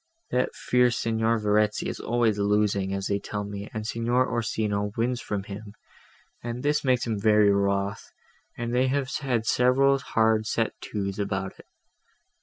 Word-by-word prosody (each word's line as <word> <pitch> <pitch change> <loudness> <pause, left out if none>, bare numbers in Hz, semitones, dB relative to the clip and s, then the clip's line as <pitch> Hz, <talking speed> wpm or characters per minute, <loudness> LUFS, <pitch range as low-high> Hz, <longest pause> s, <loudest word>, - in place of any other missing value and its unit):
That 125 0 0
fierce 125 -1 +2
Signor 115 0 +1
Verezzi 105 0 +1
is - - -4
always 115 -3 +1
losing, 100 -1 +1
as 95 0 -2
they 100 0 0
tell 105 +1 -4
me, 100 0 -7
and 110 0 -5
Signor 120 +3 +1
Orsino 105 -3 -1
wins 120 +1 0
from 100 -2 -3
him, 100 +1 -9 0.7
and 120 +2 -5
this 150 +1 +1
makes 125 -2 +2
him 110 -3 -2
very 105 -1 +4
wroth, 100 0 -1 0.5
and 120 0 -3
they 130 +1 +3
have 135 0 0
had 125 -6 -1
several 135 +4 +3
hard 110 -3 +1
set 115 -1 0
to's 100 -1 -4
about 95 -1 -3
it. - - -15
110 Hz, 160 wpm, -26 LUFS, 100-120 Hz, 0.7 s, very